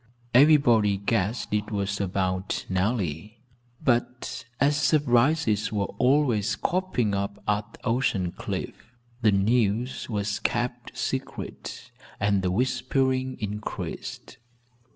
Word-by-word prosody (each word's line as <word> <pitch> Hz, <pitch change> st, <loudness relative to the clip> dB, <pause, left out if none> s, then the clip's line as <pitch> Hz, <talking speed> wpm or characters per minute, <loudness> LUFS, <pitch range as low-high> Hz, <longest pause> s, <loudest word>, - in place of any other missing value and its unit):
Everybody 120 Hz, -7 st, +5 dB
guessed 105 Hz, +2 st, -1 dB
it 105 Hz, 0 st, 0 dB
was 100 Hz, -1 st, -2 dB
about 95 Hz, 0 st, -1 dB
Nellie, 95 Hz, 0 st, -1 dB, 0.4 s
but 125 Hz, +1 st, -1 dB
as 145 Hz, +2 st, +3 dB
surprises 140 Hz, -5 st, +2 dB
were 100 Hz, -2 st, -2 dB
always 125 Hz, -6 st, +3 dB
cropping 170 Hz, -, 0 dB
up 100 Hz, +1 st, -2 dB
at 105 Hz, +2 st, -1 dB
Ocean 115 Hz, -7 st, +1 dB
Cliff, 115 Hz, +6 st, -6 dB, 0.3 s
the 110 Hz, -, +5 dB
news 110 Hz, +5 st, +1 dB
was 105 Hz, -2 st, -1 dB
kept 120 Hz, 0 st, -2 dB
secret -, -, -5 dB, 0.3 s
and 100 Hz, -1 st, +2 dB
the 90 Hz, -, 0 dB
whispering 130 Hz, +4 st, 0 dB
increased. 105 Hz, 0 st, -5 dB
110 Hz, 100 wpm, -26 LUFS, 100-125 Hz, 0.4 s, Everybody